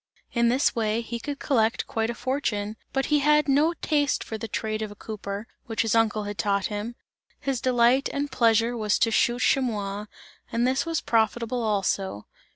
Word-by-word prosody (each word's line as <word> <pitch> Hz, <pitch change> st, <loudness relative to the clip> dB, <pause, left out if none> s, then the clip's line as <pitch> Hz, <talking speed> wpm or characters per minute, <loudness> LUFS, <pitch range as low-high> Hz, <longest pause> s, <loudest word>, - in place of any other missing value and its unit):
In 235 Hz, -1 st, +3 dB
this 255 Hz, +4 st, +2 dB
way 220 Hz, 0 st, 0 dB
he 235 Hz, 0 st, -5 dB
could 285 Hz, +3 st, -5 dB
collect 230 Hz, -7 st, +1 dB
quite 225 Hz, 0 st, -1 dB
a 235 Hz, -, -3 dB
fortune, 230 Hz, -6 st, -2 dB, 0.2 s
but 270 Hz, 0 st, 0 dB
he 295 Hz, -, +5 dB
had 300 Hz, +1 st, +4 dB
no 300 Hz, +5 st, +3 dB
taste 290 Hz, -2 st, +1 dB
for 220 Hz, -, -6 dB
the 220 Hz, +1 st, -5 dB
trade 215 Hz, +1 st, -3 dB
of 215 Hz, -, -3 dB
a 205 Hz, -, -11 dB
cooper, 205 Hz, -1 st, -6 dB, 0.2 s
which 225 Hz, -1 st, 0 dB
his 225 Hz, -, 0 dB
uncle 220 Hz, -2 st, +2 dB
had 205 Hz, 0 st, -6 dB
taught 200 Hz, -1 st, +1 dB
him; 215 Hz, +3 st, -4 dB, 0.4 s
his 270 Hz, -3 st, -2 dB
delight 250 Hz, +1 st, +3 dB
and 285 Hz, 0 st, -2 dB
pleasure 230 Hz, 0 st, +3 dB
was 215 Hz, -2 st, +1 dB
to 230 Hz, -, +2 dB
shoot 240 Hz, +2 st, +2 dB
chamois, 210 Hz, -5 st, 0 dB, 0.4 s
and 235 Hz, +1 st, +1 dB
this 265 Hz, +5 st, +1 dB
was 330 Hz, -1 st, 0 dB
profitable 230 Hz, +2 st, +1 dB
also. 195 Hz, -, -1 dB
230 Hz, 185 wpm, -26 LUFS, 215-260 Hz, 0.4 s, he